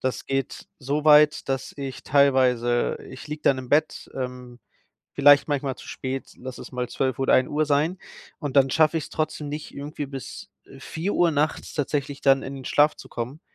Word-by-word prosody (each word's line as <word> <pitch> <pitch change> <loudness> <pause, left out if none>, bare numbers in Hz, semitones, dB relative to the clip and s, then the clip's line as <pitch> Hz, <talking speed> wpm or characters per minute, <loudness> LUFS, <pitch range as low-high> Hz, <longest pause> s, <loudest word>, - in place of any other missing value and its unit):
Das 130 -1 -2
geht 135 -1 -3
so 145 +3 -2
weit, 150 -1 +5
dass 135 0 -2
ich 135 -2 -6
teilweise 130 -4 +3
ich 130 +2 -10
liege 150 0 -6
dann 135 -2 +3
im 130 - -8
Bett, 155 +3 +1
ähm, 125 -2 -6 0.5
vielleicht 145 0 +6
manchmal 140 -3 -2
zu - - -13
spät, 130 0 -5
lass 130 0 -8
es - - -10
mal 125 -1 -3
12:00 130 0 -2
oder 135 - +3
1:00 150 +4 +2
sein, 150 +5 +1 0.4
und 145 -2 -4
dann 135 -1 +6
schaffe 160 +2 +3
ich's 160 - -4
trotzdem 155 -1 -3
nicht, 150 +1 -6
irgendwie 145 0 -6
bis, 135 -2 -8
äh, 135 - -15
4:00 175 +4 0
nachts 150 0 -1
tatsächlich 145 -1 -2
dann 135 -1 +4
in 135 +1 -6
den 130 - -9
Schlaf 150 +3 +3
zu - - -12
kommen, 125 +6 -6
140 Hz, 185 wpm, -24 LUFS, 130-150 Hz, 0.5 s, vielleicht